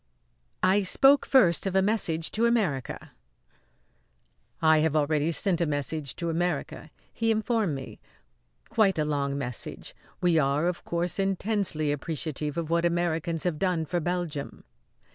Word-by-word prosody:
I 195 Hz, +2 st, +4 dB
spoke 270 Hz, +8 st, +4 dB
first 195 Hz, -, +4 dB
of 190 Hz, -, -3 dB
a 190 Hz, -, +5 dB
message 170 Hz, -6 st, 0 dB
to 230 Hz, +2 st, +2 dB
America. 195 Hz, -, -1 dB, 1.5 s
"I 160 Hz, -1 st, +4 dB
have 155 Hz, 0 st, +1 dB
already 150 Hz, +1 st, +1 dB
sent 180 Hz, +1 st, +1 dB
a 170 Hz, -, +1 dB
message 145 Hz, 0 st, -3 dB
to 170 Hz, -1 st, -3 dB
America," 175 Hz, +2 st, -3 dB, 0.2 s
he 225 Hz, 0 st, -1 dB
informed 220 Hz, -, 0 dB
me; 135 Hz, -1 st, -8 dB, 0.7 s
"quite 200 Hz, -5 st, +2 dB
a 155 Hz, -, +1 dB
long 140 Hz, -2 st, -1 dB
message. 125 Hz, -4 st, -4 dB, 0.2 s
We 175 Hz, -3 st, +3 dB
are, 140 Hz, +2 st, +1 dB
of 180 Hz, -1 st, -3 dB
course, 170 Hz, +2 st, -2 dB
intensely 195 Hz, -5 st, 0 dB
appreciative 150 Hz, 0 st, -3 dB
of 165 Hz, -1 st, -3 dB
what 170 Hz, 0 st, +2 dB
Americans 170 Hz, -1 st, 0 dB
have 175 Hz, -4 st, -1 dB
done 180 Hz, -4 st, 0 dB
for 175 Hz, +3 st, -1 dB
Belgium." 170 Hz, -4 st, -4 dB
170 Hz, 145 wpm, -27 LUFS, 150-190 Hz, 1.5 s, a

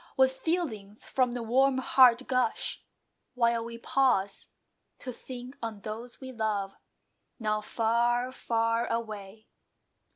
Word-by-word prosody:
What 265 Hz, -1 st, +5 dB
feelings 265 Hz, -, -3 dB
from 255 Hz, -2 st, +1 dB
the 245 Hz, -1 st, -3 dB
warm 260 Hz, +3 st, +3 dB
heart 260 Hz, -1 st, +5 dB
gush, 255 Hz, -3 st, 0 dB, 0.5 s
While 235 Hz, -1 st, +2 dB
we 230 Hz, 0 st, -7 dB
pause 235 Hz, -6 st, +1 dB, 0.5 s
to 255 Hz, -, -6 dB
think 250 Hz, +2 st, -9 dB
on 225 Hz, -3 st, -5 dB
those 225 Hz, +4 st, -7 dB
we 260 Hz, -1 st, -8 dB
love, 210 Hz, -4 st, -1 dB, 0.7 s
Now 215 Hz, -1 st, 0 dB
far, 240 Hz, +3 st, +1 dB
far 230 Hz, -1 st, 0 dB
away! 215 Hz, -2 st, -5 dB
235 Hz, 120 wpm, -29 LUFS, 220-255 Hz, 0.7 s, What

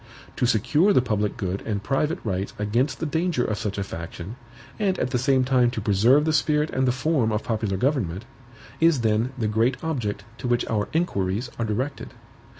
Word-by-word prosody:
To 125 Hz, -, +2 dB
secure 150 Hz, -, +3 dB
the 130 Hz, -, +5 dB
public 105 Hz, -4 st, -1 dB
good 95 Hz, 0 st, -2 dB
and 100 Hz, -2 st, -3 dB
private 150 Hz, -, 0 dB
rights 95 Hz, -2 st, -3 dB
against 115 Hz, +7 st, 0 dB
the -, -, -2 dB
danger 160 Hz, -4 st, 0 dB
of 105 Hz, -, -2 dB
such 105 Hz, -1 st, -3 dB
a 100 Hz, -, -1 dB
faction, 85 Hz, +3 st, -7 dB, 0.4 s
and 195 Hz, -3 st, +1 dB
at 125 Hz, -, -1 dB
the 125 Hz, -, +1 dB
same 135 Hz, 0 st, +3 dB
time 125 Hz, -2 st, +3 dB
to 120 Hz, -, -4 dB
preserve 110 Hz, +8 st, +4 dB
the 160 Hz, -, +1 dB
spirit 150 Hz, 0 st, +2 dB
and 130 Hz, 0 st, +1 dB
the -, -, +4 dB
form 130 Hz, -3 st, +1 dB
of 105 Hz, +1 st, -1 dB
popular 110 Hz, -4 st, -1 dB
government, 115 Hz, -, -1 dB, 0.5 s
is 165 Hz, -5 st, +4 dB
then 110 Hz, +2 st, +1 dB
the 110 Hz, -3 st, 0 dB
great 115 Hz, +4 st, +1 dB
object 125 Hz, -11 st, -2 dB, 0.2 s
to -, -, -4 dB
which 120 Hz, 0 st, +1 dB
our 105 Hz, -2 st, -1 dB
inquiries 115 Hz, -, -1 dB
are 115 Hz, -, 0 dB
directed. 130 Hz, +6 st, -3 dB
120 Hz, 195 wpm, -24 LUFS, 105-140 Hz, 0.5 s, the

